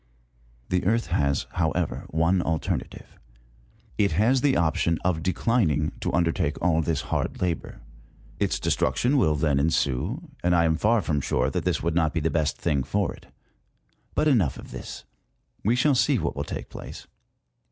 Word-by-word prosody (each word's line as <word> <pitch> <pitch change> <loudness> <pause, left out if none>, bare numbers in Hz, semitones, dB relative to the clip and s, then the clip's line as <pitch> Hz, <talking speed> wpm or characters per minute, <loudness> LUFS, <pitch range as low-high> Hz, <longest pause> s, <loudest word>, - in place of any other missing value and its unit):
The 90 0 +1
Earth 115 +5 +1
has, 70 -5 +1
however, 85 0 -1
one 85 +4 +2
alternative; 80 -2 -3 0.8
it 100 -1 +3
has 120 +5 +3
the 140 -1 +3
option 85 0 +1
of 90 -3 +1
declining 90 - +1
to - - -2
undertake 80 -1 0
all 85 -2 +2
this 80 -2 -1
hard - - -1
labour. 90 -4 -3 0.6
Its - - +1
destruc 65 - 0
tion 125 - +2
will 80 - +3
then 75 -2 +1
ensue, 80 - -1
and 90 0 +3
I 85 -1 +4
am 80 -1 +2
far 105 +5 +2
from 75 -3 0
sure 65 0 0
that 90 -3 -2
this 90 -5 0
would 85 0 0
not 80 -1 +1
be - - +2
the 80 +1 0
best 80 -3 0
thing 75 -5 0
for 95 +9 -1
it. - - -16 0.9
But 155 - +2
enough 105 - +2
of - - -11
this: - - -8 0.6
we 115 +4 +3
shall 140 +4 +3
see 125 - +3
what - - -2
will - - -3
take - - -6
place. - - -9
85 Hz, 175 wpm, -25 LUFS, 75-100 Hz, 0.9 s, I